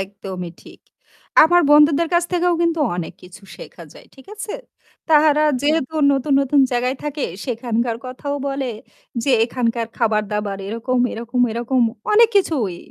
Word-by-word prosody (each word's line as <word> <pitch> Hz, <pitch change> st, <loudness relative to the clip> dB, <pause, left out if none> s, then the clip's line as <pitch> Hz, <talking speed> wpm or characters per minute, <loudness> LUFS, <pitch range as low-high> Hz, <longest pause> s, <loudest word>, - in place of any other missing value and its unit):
একদমই 190 Hz, -2 st, -7 dB
ঠিক। -, -, -16 dB, 0.6 s
আমার 350 Hz, +2 st, +5 dB
বন্ধুদের 300 Hz, +2 st, +5 dB
কাছ 345 Hz, 0 st, +3 dB
থেকেও 355 Hz, 0 st, +2 dB
কিন্তু 335 Hz, -1 st, 0 dB, 0.2 s
অনেক 170 Hz, -, -5 dB
কিছু 180 Hz, +2 st, -14 dB
শেখা -, -, -12 dB
যায়, -, -, -16 dB
ঠিক 265 Hz, -, -17 dB
আছে? 430 Hz, 0 st, -6 dB, 0.6 s
তাহারা 305 Hz, -1 st, +4 dB, 0.2 s
যেহেতু 310 Hz, 0 st, 0 dB, 0.2 s
নতুন, 275 Hz, +1 st, 0 dB
নতুন 280 Hz, +1 st, +2 dB
জায়গায় 250 Hz, +2 st, 0 dB
থাকে, 295 Hz, -1 st, -4 dB, 0.2 s
সেখানকার 235 Hz, -1 st, -2 dB
কথাও 270 Hz, +3 st, -5 dB
বলে 275 Hz, -1 st, -3 dB, 0.6 s
যে, -, -, -3 dB, 0.2 s
এখানকার 235 Hz, -2 st, -2 dB
খাবার 215 Hz, -3 st, +1 dB
দাবার 205 Hz, -2 st, -3 dB
এরকম, 230 Hz, +4 st, -2 dB
এরকম, 235 Hz, +2 st, -3 dB
এরকম। 240 Hz, +3 st, -1 dB, 0.3 s
অনেক 450 Hz, +2 st, +6 dB
কিছুই 260 Hz, -, 0 dB
255 Hz, 145 wpm, -20 LUFS, 225-300 Hz, 0.6 s, অনেক